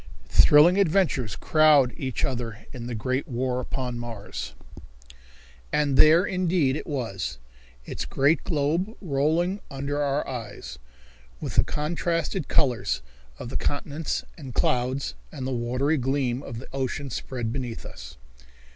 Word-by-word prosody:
Thrilling 170 +6 +7
Adventures 165 - +2
Crowd 150 -5 +5
Each 130 -3 -2
Other 120 -4 -4
In 120 -2 -6
the 120 - -3
Great 130 +7 -1
War 125 -1 -1
Upon 125 -1 -3
Mars. 115 -4 -6 1.2
And 145 -2 +2
there, 160 +6 +7
indeed, 180 -8 +1
it 155 - -5
was, 95 - -3 0.5
its - - -4
great 140 +4 +2
globe 165 +8 0
rolling 165 +4 +1
under 140 +1 -2
our 140 0 0
eyes, 100 - -6 0.6
with - - -4
the - - +5
contrasted 165 +3 -1
colors 100 - +1 0.3
of 120 - -6
the - - -2
continents 145 +2 -2 0.2
and 130 -5 -8
clouds 130 +2 +1 0.2
and 130 - -5
the 135 - -2
watery 125 +5 +1
gleam 130 -1 0
of 115 - -7
the 125 - -8
ocean 135 +1 -2
spread 115 -1 -3
beneath 125 -4 -4
us. 65 +2 -10
135 Hz, 135 wpm, -26 LUFS, 120-150 Hz, 1.2 s, Thrilling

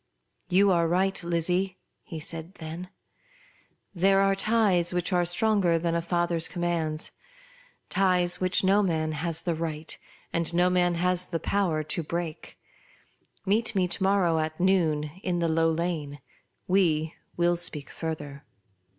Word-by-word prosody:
'• - - -22
You 195 +2 +5
are 170 -2 +3
right, 190 +2 +1
Lizzie," 175 +2 -1 0.2
he 175 -7 -8
then 155 - -4 0.3
said; 165 +3 -7 0.5
" - - -34
there 195 +1 +5
are 195 0 +3
ties 195 -4 +2
which 180 +2 -1
are 175 -1 +3
stronger 185 -1 +2
than 165 0 -1
a 170 - +1
father's 170 -1 +1
commands; 165 -3 -2 0.8
ties 180 -2 +2
which 185 +1 +2
no 195 +2 +4
man 160 -5 0
has 160 +2 -2
the 170 - 0
right, 160 -1 -4 0.4
and 170 -1 0
no 180 +1 +3
man 175 -1 +2
has 180 +1 0
the 165 - -3
power 170 -6 0
to 155 - -1
break. 165 0 -5 0.9
Meet 215 +3 +1
me 185 -2 +2
to - - -2
morrow 190 -4 +2
at 155 0 -3
noon 160 -5 +2
in 180 -3 -1
the 170 -1 +1
Low 165 0 +2
Lane; 160 -3 -2 0.5
we 165 -4 +2 0.2
will 175 0 +3
speak 150 -4 -3
further." 150 -4 -6
175 Hz, 150 wpm, -27 LUFS, 160-185 Hz, 0.9 s, You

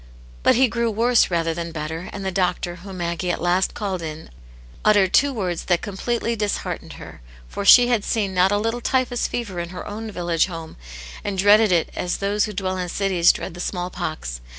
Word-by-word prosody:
But - - +4
he 260 +2 +5
grew 235 0 -1
worse 230 +2 +3
rather 165 -2 0
than 170 0 -5
better, 160 +2 -5
and 200 -1 -6
the 190 - -1
doctor, 180 -1 -1
whom 190 +1 -9
Maggie 170 +1 -2
at - - -1
last 175 +2 +1
called 190 -4 -3
in, 155 -1 -7 0.5
uttered 205 -3 +4
two 285 +1 +4
words 185 -9 -3
that 175 -2 +1
completely 230 +3 -2
disheartened 210 -2 -3
her, - - -11 0.3
for 200 - -5
she 245 +4 +8
had 235 -4 +1
seen 205 -4 -1
not 185 +1 +3
a 205 - +2
little 225 +3 -2
typhus 250 -1 0
fever 205 -7 -4
in 170 0 -4
her 180 0 -7
own 220 +2 -6
village 175 -4 0
home 165 -3 -8 0.5
and 200 -1 -3
dreaded 205 +2 +5
it 170 -2 +2
as 180 - -2
those 200 +1 0
who 210 - -6
dwell 185 -1 -2
in 180 -1 -3
cities 185 -3 +3
dread - - -6
the 175 - -10
small 180 0 -3
pox. - - -5
190 Hz, 205 wpm, -22 LUFS, 175-215 Hz, 0.5 s, she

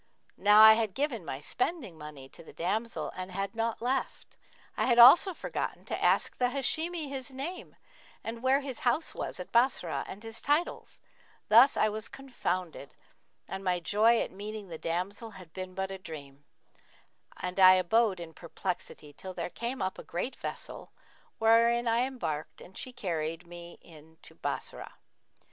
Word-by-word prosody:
Now 210 +1 +7
I 220 0 +11
had 220 -3 -1
given 270 - -1
my 135 -4 -5
spending 250 - -3
money 150 -3 -10
to - - -15
the - - -14
damsel 215 +7 -2
and 185 0 -6
had 195 +1 -3
naught 225 0 -2
left: 260 +2 -2 0.4
I - - 0
had 240 -2 +3
also 275 +11 +9
forgotten - - -4
to - - -4
ask - - +2
the 250 -1 +2
Hashimi 315 +5 0
his 270 -1 -6
name 280 +8 -7 0.5
and 230 +1 -6
where 265 +2 +3
his 270 -4 -6
house 255 +6 0
was - - -5
at 180 - -8
Bassorah 235 -8 +2
and 205 - -9
his 225 0 -5
titles; 295 +5 -1 0.5
thus 235 +6 +7
I - - +4
was 215 +1 -4
confounded 185 - -5 0.5
and 190 0 -6
my 180 -2 +1
joy 220 +6 +3
at - - -3
meeting 205 0 -7
the 165 -2 -7
damsel 185 +7 -3
had 180 -4 -14
been 185 -1 -7
but 190 0 -3
a 190 - -6
dream; 145 -5 -10 0.9
and 180 +2 -4
I 185 0 +9
abode 190 +2 +2
in 165 -1 -8
perplexity 170 -3 -6
till 185 +5 -9
there 175 0 -4
came 240 -1 -3
up 185 - -3
a - - -8
great 210 +10 -4
vessel - - -7 0.5
wherein 235 +2 +4
I 235 +3 +2
embarked 155 - -5
and 190 - -14
she 255 - -5
carried 170 -7 -3
me 175 0 -11 0.5
to - - -13
Bassorah. - - -5
210 Hz, 165 wpm, -30 LUFS, 180-245 Hz, 0.9 s, I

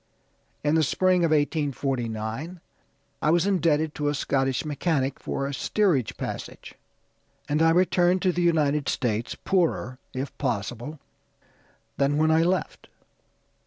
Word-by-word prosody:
In 150 +1 +2
the 160 - +4
spring 180 +4 +2
of 165 - +3
1849 140 -1 -1 0.6
I - - +2
was 170 +2 +3
indebted 160 -5 +1
to 150 - -2
a 145 - +1
Scottish 135 -1 0
mechanic 145 -3 -1
for 140 - -3
a 140 - -3
steerage 165 - +1
passage, - - -6 0.7
and 150 +2 +1
I 165 - +5
returned 180 +1 +3
to 185 - +3
the 175 - -2
United 150 -4 +2
States, 115 -2 -1
poorer, 165 -9 0
if 130 +2 -5
possible, 125 +3 -3 1.0
than 140 +1 +2
when 155 +1 +3
I 160 +1 +4
left. 180 +3 -1
150 Hz, 130 wpm, -25 LUFS, 135-170 Hz, 1.0 s, I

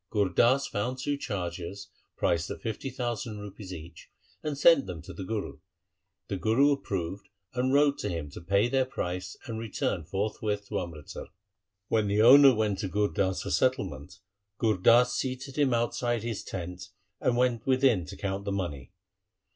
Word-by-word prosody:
Gur 100 -3 +1
Das 130 +9 +3
found 120 +2 -2
two 145 +2 -1
chargers 95 -5 -5 0.3
priced 85 0 +1
at - - -7
fifty 115 +4 -3
thousand 120 -3 -3
rupees 105 -1 -9
each, 85 -2 -10 0.3
and 150 -2 -3
sent 145 - +6
them 90 -3 -5
to 95 - -9
the 90 - -6
Guru. 105 +2 -4 0.7
The 100 - -3
Guru 120 +9 +3
approved 100 -8 -3 0.2
and 130 +1 0
wrote 145 0 +4
to - - -2
him 80 -4 -4
to - - -9
pay 100 +6 +2
their 135 +1 +2
price 90 -7 -4
and 115 -3 -5
return 100 -5 -2
forthwith 105 +3 -2
to 105 - -1
Amritsar. 85 -5 -7 0.6
When 110 -1 +1
the 100 +1 +1
owner 135 +2 +9
went 105 -3 0
to 100 - -2
Gur 105 +2 +1
Das 95 +3 -1
for - - -4
settlement, 95 - 0 0.4
Gur 110 -3 +2
Das 120 +6 +5
seated 130 +1 -3
him 145 -3 +2
outside 120 -1 0
his 115 -3 -3
tent 90 0 -6 0.3
and 120 - +1
went 125 -2 +1
within 130 - +3
to - - -9
count 100 0 -3
the 100 - -2
money. 85 -10 -4
105 Hz, 170 wpm, -28 LUFS, 95-125 Hz, 0.7 s, owner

